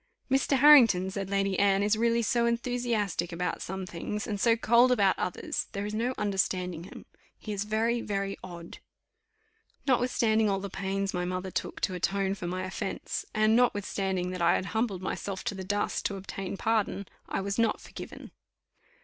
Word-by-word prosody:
"Mr. 270 +1 +3
Harrington," 240 -10 +7
said 195 0 -4
Lady 195 -1 0
Anne, 200 0 +3
"is 210 +1 +3
really 235 +1 +2
so 235 +2 +2
enthusiastic 235 -7 -1
about 180 +1 -2
some 190 +1 -4
things, 195 +4 -4
and 205 -4 -3
so 230 -1 +5
cold 235 +2 +4
about 200 -6 +4
others, 180 - -2
there 200 +1 -3
is 210 - -4
no 240 +4 -1
understanding 185 -4 -1
him; - - -11 0.3
he 215 - -6
is 200 0 -2
very, 225 +2 +1
very 195 -2 -2
odd." 170 -2 -9 1.1
Notwithstanding 235 -4 +2
all 195 -1 +1
the 200 -1 -6
pains 195 0 -2
my 180 -1 -1
mother 185 +1 -3
took - - -3
to 185 - 0
atone 195 +2 0
for 185 -3 -5
my 185 +1 -3
offence, 190 +1 -4
and 215 +1 +4
notwithstanding 195 -6 +1
that 185 -1 -5
I 170 +1 +4
had - - -1
humbled 220 -5 -1
myself 190 0 -4
to - - -2
the 190 -1 -6
dust 205 +2 -1
to 200 - -5
obtain 195 0 -5
pardon, 215 -3 0 0.2
I - - -1
was 200 +3 -2
not 230 -1 +2
forgiven. - - -10
200 Hz, 175 wpm, -29 LUFS, 190-225 Hz, 1.1 s, Harrington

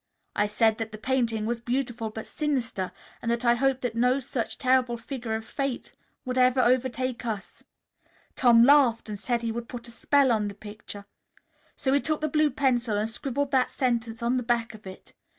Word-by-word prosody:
I 205 - +2
said 220 +1 +2
that 225 -1 -4
the 215 - -7
painting 230 -2 0
was 235 +1 -1
beautiful 240 -2 -2
but 220 +1 -7
sinister, 255 -11 -2 0.3
and 230 - -3
that 235 +1 -1
I 235 - +6
hoped 265 +1 +1
that 245 -2 -2
no 250 +3 +2
such 250 -3 -4
terrible 255 -2 +2
figure 235 -2 -4
of 220 0 -5
Fate 275 -1 -4 0.3
would 255 0 -1
ever 255 +1 +4
overtake 255 0 +1
us. 220 -4 -5 0.7
Tom 235 -2 +6
laughed 250 -5 +5
and 205 -1 -5
said 235 +3 -1
he 230 - -1
would 235 +1 -5
put 240 -2 -7
a - - -9
spell 270 +3 +3
on 215 -2 +1
the 200 - -6
picture. 205 -1 -10 0.7
So 265 - 0
he 280 - +4
took 310 +1 -1
the 310 - -1
blue 305 0 +2
pencil 245 -7 +1
and 210 +1 0
scribbled 270 +4 -3
that 260 -2 +3
sentence 235 -3 -1
on 240 +2 +1
the - - 0
back 235 -1 0
of 210 -2 -12
it. 185 - -11
240 Hz, 200 wpm, -27 LUFS, 225-260 Hz, 0.7 s, I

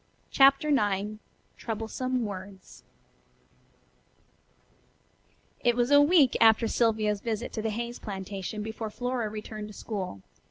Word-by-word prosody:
CHAPTER 275 +2 +5
IX 210 -5 0 0.4
TROUBLESOME 235 +3 -3
WORDS 190 -1 -9 2.8
It 240 -1 +3
was 240 +2 +1
a 285 0 +8
week 290 -4 +5
after 225 +1 +6
Sylvia's 215 -3 +1
visit 230 0 -3
to 220 - -3
the 220 - -1
Hayes 235 +2 -4
plantation 195 0 -5
before 220 0 -5
Flora 245 0 -3
returned 215 0 -7
to 210 - -12
school. 185 - -5
220 Hz, 115 wpm, -28 LUFS, 210-245 Hz, 2.8 s, a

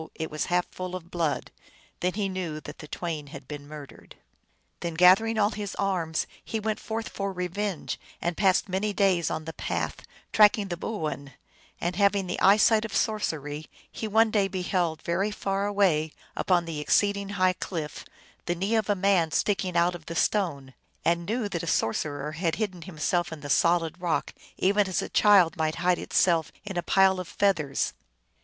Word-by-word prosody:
it 160 -1 -4
was 155 - -1
half 180 0 +1
full 185 0 -5
of 175 -1 -9
blood. 165 -4 -1 0.5
Then 180 0 0
he 205 -1 -1
knew 180 -5 -4
that 145 - -10
the 150 - -9
twain 155 -3 -4
had 140 -1 -10
been 145 -1 -8
murdered. 150 -2 -11 0.6
Then 170 -2 -4
gathering 190 +6 +5
all 210 0 +3
his 205 -2 -5
arms, 175 -5 -1 0.2
he 225 - -3
went 215 0 -2
forth 225 0 -4
for 200 0 -3
revenge, 180 +1 -3 0.2
and 175 0 -2
passed 190 0 +3
many 200 +2 -1
days 185 -5 +2
on 155 0 -4
the 160 - -6
path, - - -3 0.4
tracking 210 -1 +5
the 175 - -2
boo 205 +1 -4
oin; 140 -2 -5 0.5
and 175 +1 -2
having 200 -1 +3
the 180 - -3
eyesight 215 +2 +5
of 220 -2 -5
sorcery, 155 -10 -1 0.2
he 220 - -4
one 220 +1 +4
day 205 -2 +2
beheld 180 -3 -1
very 185 +5 0
far 200 -1 -1
away, 180 -7 +2 0.2
upon 180 -2 +2
an 165 -1 -6
exceeding 200 +6 +1
high 185 -1 +4
cliff, 165 -4 -5 0.4
the 175 - +1
knee 195 +6 -1
of 215 -2 0
a 205 - +3
man 185 -4 +3
sticking 185 +1 0
out 175 +1 +3
of 170 -3 -10
the 170 - -5
stone, 150 -9 0 0.3
and 170 0 +1
knew 225 0 -1
that 175 -5 -3
a 170 - -6
sorcerer 145 +3 -1
had 165 +1 -1
hidden 190 -3 -3
himself 175 +1 -1
in 160 -2 -7
the 145 0 -4
solid 170 +1 +2
rock, 170 -3 -1 0.2
even 200 +1 +3
as 185 - -1
a - - -6
child 195 -5 +5
might 155 -1 0
hide 180 +1 +1
itself 165 -3 +2
in 200 -2 -5
a 175 - 0
pile 190 +1 +4
of 180 - -5
feathers. 170 -10 0
180 Hz, 185 wpm, -27 LUFS, 160-200 Hz, 0.6 s, gathering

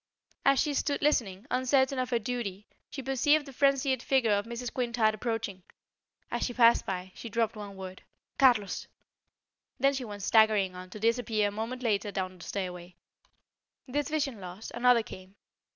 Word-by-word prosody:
As 275 -1 +4
she 295 - +1
stood 285 +1 -1
listening, 210 -10 +1
uncertain 265 +1 +2
of 255 -1 -1
her 240 - +2
duty, 215 -4 -4 0.2
she 270 - -7
perceived 290 +3 +2
the 275 - -11
frenzied 275 -1 +2
figure 255 -5 +2
of 205 +2 +1
Mrs. 235 +1 -5
Quintard 235 -3 +1
approaching. 215 -3 -3 0.7
As - - -2
she 245 - -2
passed 235 -1 +5
by, 185 -1 -4
she 230 - -8
dropped 225 0 0
one 205 -2 -8
word: 190 -1 -8 0.4
"Carlos!" 235 -8 +3 0.9
Then 275 0 +4
she 265 -2 -3
went 205 -3 -7
staggering 215 -3 +4
on, 185 0 -9
to 210 - -9
disappear 225 -2 +1
a - - -8
moment 230 +5 -5
later 205 -3 0
down 185 -1 -4
the - - -10
stairway. 180 -2 -5 0.9
This 290 +4 -1
vision 285 -7 -1
lost, 185 +4 -8
another 240 -1 +4
came. 185 -1 -12
230 Hz, 170 wpm, -29 LUFS, 200-255 Hz, 0.9 s, passed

